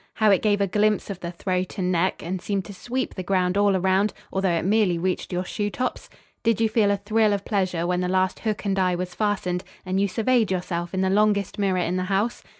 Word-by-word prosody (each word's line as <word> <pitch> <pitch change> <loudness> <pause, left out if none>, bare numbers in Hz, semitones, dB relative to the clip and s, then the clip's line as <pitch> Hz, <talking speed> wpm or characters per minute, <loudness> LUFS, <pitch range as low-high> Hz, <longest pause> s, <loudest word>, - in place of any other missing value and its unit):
How 215 -1 +4
it 195 - +4
gave 205 -2 +2
a - - +4
glimpse 210 +1 +1
of 190 - -6
the 170 - -5
throat 185 +2 -3
and 185 -1 0
neck, 180 +1 0
and 180 +2 -3
seemed 195 -1 -2
to 200 - -9
sweep 250 +7 -3
the 185 - -5
ground 185 0 +1
all 200 -1 +3
around, 190 +3 +2 0.2
although 190 0 +1
it 170 -1 0
merely 200 -3 +3
reached 185 +2 -2
your 180 +1 -2
shoe 205 +2 -2
tops? 255 +4 -3 0.3
Did 230 -2 +1
you 225 - +3
feel 215 -2 +3
a 200 - +2
thrill 215 +1 +2
of 200 0 -3
pleasure 185 -5 0
when 180 0 0
the 180 - -1
last 185 0 +1
hook 215 -1 -3
and 195 -1 0
eye 180 -1 +2
was 180 0 -4
fastened 185 -2 -1 0.2
and 185 +1 0
you 200 - +3
surveyed 225 +2 +1
yourself 175 -1 -3
in 190 - 0
the 190 0 +1
longest 205 -1 +2
mirror 195 -2 +1
in 180 0 0
the 185 - -1
house? 200 +5 0
190 Hz, 245 wpm, -24 LUFS, 180-205 Hz, 0.3 s, How